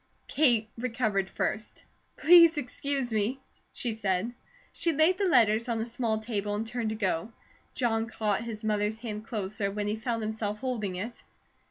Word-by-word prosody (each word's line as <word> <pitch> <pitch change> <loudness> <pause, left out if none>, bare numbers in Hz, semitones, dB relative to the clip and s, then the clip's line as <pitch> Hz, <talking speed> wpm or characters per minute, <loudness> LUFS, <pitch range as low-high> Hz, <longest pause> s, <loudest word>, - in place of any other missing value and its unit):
Kate 240 -7 +3
recovered 220 -6 0
first. 215 +1 -3 0.3
"Please 335 -1 +7
excuse 270 -2 -2
me," 220 +5 0 0.3
she 235 -3 -2
said. 205 +1 -1 0.4
She 335 - +1
laid 320 +5 +3
the 400 - +2
letters 230 -6 +4
on 230 -1 0
a 220 - -1
small 230 -2 -1
table 210 -2 -2
and 215 +2 -2
turned 230 -1 -2
to 220 - -2
go. 195 -1 -1 0.4
John 225 -3 +1
caught 215 -2 -1
his 225 -2 -6
mother's 210 0 0
hand 220 -2 -6
closer, 205 -2 -2
when 205 +1 -3
he 210 - 0
found 225 0 -2
himself 215 -1 -2
holding 215 -6 -3
it. 220 +6 -5
220 Hz, 165 wpm, -29 LUFS, 210-245 Hz, 0.4 s, Please